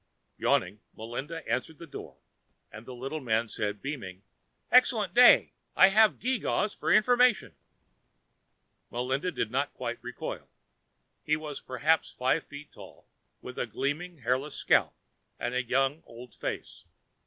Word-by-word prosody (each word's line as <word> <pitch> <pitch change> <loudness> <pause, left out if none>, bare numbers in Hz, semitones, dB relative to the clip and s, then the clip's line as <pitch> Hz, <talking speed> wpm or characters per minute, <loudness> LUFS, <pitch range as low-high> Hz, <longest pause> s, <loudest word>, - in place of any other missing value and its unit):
Yawning, 100 +4 +1 0.2
Melinda 135 +9 -6
answered 130 +7 -2
the 170 - -10
door 150 - -10 0.5
and 110 +3 -11
the 130 - -8
little 135 +5 -5
man 115 -3 0
said, 105 -1 -4
beaming, 100 -10 -6 0.5
"Excellent 225 -7 +4
day. 245 +2 +7 0.2
I 190 - +7
have 215 +2 +4
geegaws 235 -3 -1
for - - -2
information." 245 +1 +4 1.4
Melinda 130 +8 -2
did 110 - -3
not 140 +3 -1
quite 120 -1 -4
recoil. 125 -1 -6 0.7
He 155 - +1
was 155 -2 -7
perhaps 150 +6 +1
five 130 +5 0
feet 145 0 -11
tall, - - -14 0.4
with 125 - -8
a - - -1
gleaming 145 +8 -3
hairless 130 +5 -1
scalp - - +2 0.4
and 120 - -3
a 125 - +1
young 135 +4 0
old 120 +1 -12
face. - - -6
135 Hz, 135 wpm, -29 LUFS, 120-165 Hz, 1.4 s, day